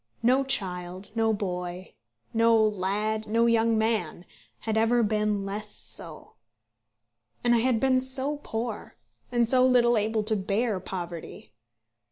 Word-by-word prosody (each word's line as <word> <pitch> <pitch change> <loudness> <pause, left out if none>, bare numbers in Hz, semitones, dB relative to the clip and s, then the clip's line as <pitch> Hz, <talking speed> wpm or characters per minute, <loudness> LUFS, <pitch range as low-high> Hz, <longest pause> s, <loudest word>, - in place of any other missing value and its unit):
No 255 +3 +4
child, 185 -6 -2
no 225 -1 +2
boy, 180 -3 -4 0.4
no 230 0 +4
lad, 215 +1 0
no 230 +2 +2
young 230 -1 +3
man, 220 -6 -1 0.4
had 220 -1 -2
ever 230 +2 +3
been 210 -1 0
less 210 +2 -5
so. 160 -2 -8 1.1
And 240 - +3
I 235 - +4
had 240 -1 +2
been 260 0 +3
so 265 +3 -1
poor; 225 -5 -5 0.4
and 240 -1 +2
so 255 +1 +4
little 240 -2 +4
able 215 +1 0
to 215 +1 0
bear 205 +1 0
poverty. 175 - -7
220 Hz, 135 wpm, -27 LUFS, 195-235 Hz, 1.1 s, No